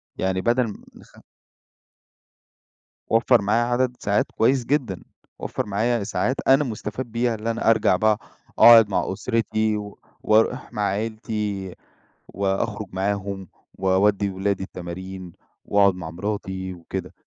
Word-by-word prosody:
يعني 95 0 -1
بدل 120 +3 +2
م 105 - -9
نخ - - -18 1.9
وفّر 115 +1 +4
معايّا 105 +4 +2
عدد 125 +1 0
ساعات 100 +1 0
كويس 125 +2 +2
جدًا، 125 - -1 0.4
وفّر - - -3
معايّا 110 +2 0
ساعات 125 +5 -1
أنا 135 +2 +5
مُستفاد 115 0 -5
بيها 120 0 0
اللي 110 +1 -2
أنا 115 0 0
أرجع 115 - +4
بقى 110 -1 +2 0.4
أقعد 115 -3 +9
مع 95 - -1
أُسرتي 110 0 0
و 105 -1 -8 0.2
واروح 110 +1 +2
مع 105 - -3
عيلتي، 105 -2 -3 0.5
وأخرج 100 +2 -2
معاهم 100 0 -3 0.3
واودّي 100 +2 +2
اولادي 95 0 -2
التمارين، 95 0 -8 0.3
واقعد 100 -2 +4
مع 85 -3 -7
مراتي 95 0 -4
وكده. 85 -2 -7
105 Hz, 125 wpm, -23 LUFS, 95-115 Hz, 1.9 s, أقعد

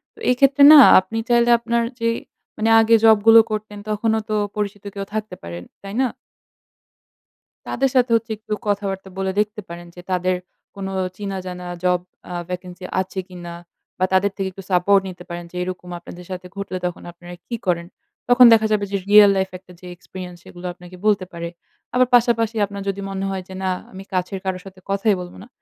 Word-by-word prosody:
তো - - -18
এক্ষেত্রে 275 +3 +4
না 305 - +11 0.2
আপনি 190 +4 -6
চাইলে 240 0 +4
আপনার 235 0 0 0.2
যে 230 - 0 0.5
মানে 220 +1 +1
আগে 225 +1 +5
জবগুলো 225 +1 +7
করতেন 210 -1 -4
তখনও 220 +1 +1
তো 215 - 0 0.2
পরিচিত 205 -1 -3
কেউ 200 -1 -5
থাকতে 215 -3 -4
পারে, 85 0 -7 0.2
তাই 195 0 -8
না? 260 - +3 1.6
তাদের 270 +2 0
সাথে 250 -1 +3
হচ্ছে 225 0 -1
একটু 215 0 -6
কথাবার্তা 195 -1 -2
বলে 190 0 -1
দেখতে 210 0 -1
পারেন 175 0 -9
যে 175 - -10
তাদের 185 0 +1 0.4
কোন 195 -1 -6 0.3
চিনাজানা 185 -3 -6 0.2
জব 180 -1 +2 0.3
আ - - -4 0.2
ভ্যাকেন্সি 180 0 -7 0.2
আছে 190 +1 -5
কিনা? 175 -2 -9 0.5
বা 185 - +3
তাদের 195 +2 +3
থেকে 195 - -1
একটু 195 +1 -11
সাপোর্ট 195 +2 +4
নিতে 180 -1 -10
পারেন 175 0 -6
যে, - - -14
"এরকম 180 0 -6
আপনাদের 175 +1 -11
সাথে 180 0 -6
ঘটলে 200 -2 -4
তখন 180 - -4
আপনারা 175 +1 -12
কি 240 - -3
করেন?" 170 -1 0 0.4
তখন 245 +1 +8
দেখা 220 -1 +4
যাবে 205 -1 +1
যে 200 - +1
রিয়াল 210 0 +8
লাইফ 190 0 0
একটা 185 0 -19
যে 180 - -14
এক্সপেরিয়েন্স 180 0 -9
সেগুলো 175 0 -12
আপনাকে 180 +1 -13
বলতে 205 -3 +2
পারে। 170 0 -5 0.5
আবার 250 0 +4
পাশাপাশি 230 -2 +2
আপনার 200 0 -8
যদি 195 0 -3
মনে 195 0 -3
হয় 190 -1 -4
যে, 190 - -10
"না, 190 - +1 0.2
আমি 190 0 -9
কাছের 185 +1 -2
কারো 190 -1 -2
সাথে 190 -1 -12
কথাই 200 +1 +2
বলব 180 0 -9
না।" - - -14
195 Hz, 185 wpm, -21 LUFS, 180-215 Hz, 1.6 s, না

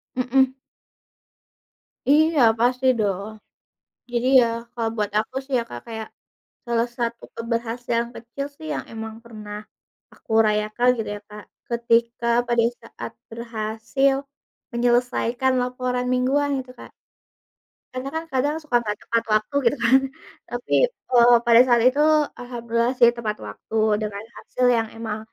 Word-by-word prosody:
Mhm. 260 +1 +2 1.6
Iya, 310 +2 +4 0.2
pasti 250 +2 +1
dong. 200 0 -1 0.8
Jadi 240 +1 0
ya, 240 - +3 0.3
kalau 230 -2 -1
buat 210 -2 -1
aku 220 +4 -3
sih 270 0 -5
ya, - - 0
Kak, 120 - -7
kayak 220 -1 -6 0.6
salah 235 0 +1
satu 235 -1 -3
keberhasilan 235 0 -2
kecil 235 +5 -6
sih, 315 - -10
yang - - -4
emang 220 -1 -6
pernah 210 -2 -8 0.6
aku - - -25 0.2
rayakan 215 +3 +1
gitu 225 - -3
ya, - - -10
Kak. 210 0 -10 0.3
Ketika 235 0 +1 0.2
pada 240 -1 +2 0.2
saat - - -8 0.2
berhasil, 230 +4 -1 0.6
menyelesaikan 245 +1 +1
laporan 250 0 -2
mingguan 275 +3 +1
gitu, 255 -1 -11
Kak. - - -12 1.0
Karena 255 +2 -4
kan 320 +1 -2
kadang 285 +4 +1
suka 280 -7 0
enggak 210 -2 -3
tepat 230 0 +1
waktu 215 +7 -9
gitu - - -5
kan. 260 +3 +6 0.5
Tapi, 245 0 -4 0.2
eee, 245 - +4
pada 235 0 +7
saat 240 -2 +4
itu, 260 +4 +4 0.4
alhamdulillah 235 -1 -1
sih 235 -1 +7
tepat 220 -3 -3
waktu 105 - -9 0.3
dengan 210 -2 -3 0.2
hasil 250 - -2
yang 225 - 0
emang 220 -2 -4
235 Hz, 135 wpm, -23 LUFS, 225-255 Hz, 1.6 s, pada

